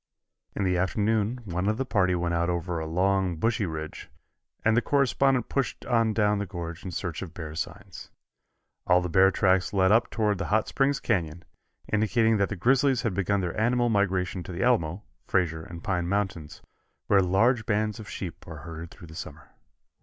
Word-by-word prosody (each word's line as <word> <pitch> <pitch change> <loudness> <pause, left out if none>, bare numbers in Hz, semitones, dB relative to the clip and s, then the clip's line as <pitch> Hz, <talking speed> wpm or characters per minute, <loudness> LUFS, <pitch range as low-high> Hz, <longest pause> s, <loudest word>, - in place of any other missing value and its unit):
In 105 - -1
the 90 -2 +1
afternoon 105 +5 0
one 90 +1 -1
of 110 - 0
the 135 - -1
party 95 -6 +2
went 85 0 -1
out 85 +1 +1
over 85 -1 -2
a 80 - -4
long, 95 +2 +1
brushy 110 +3 0
ridge, 80 -1 -6 0.6
and 110 0 +4
the 120 - +4
correspondent 135 -2 +2
pushed 140 -2 -2
on 115 -2 +2
down 105 -1 +2
the 100 - -3
gorge 85 -1 -6
in 95 - -5
search 85 -2 -4
of 85 -3 -8
bear 80 -3 -6
signs. 80 - -7 0.8
All 90 0 +5
the 90 - -3
bear 95 +1 +6
tracks 95 -1 +2
led 95 -1 +3
up 115 +2 +4
toward 105 -4 0
the 90 - -2
Hot 110 +1 +1
Springs 135 0 +1
Canyon, 85 -6 -2 0.5
indicating 110 +1 +3
that 100 -1 +1
the - - -3
grizzlies 130 +6 +2
had 115 -6 0
begun 100 +1 0
their 90 -2 -3
annual 120 +1 +2
migration 95 -3 0
to 85 - -8
the 85 - -2
Alamo, 105 -7 +1 0.2
Frazier 85 -3 0
and 85 +1 -10
Pine 90 -4 -1
mountains, 95 -7 -3 0.4
where 100 - +4
large 110 +5 +2
bands 105 0 0
of 105 -3 -9
sheep 90 -3 -7
are - - -8
herded 85 0 -7
through 90 - -13
the 80 - -13
summer. - - -9
95 Hz, 190 wpm, -27 LUFS, 85-110 Hz, 0.8 s, bear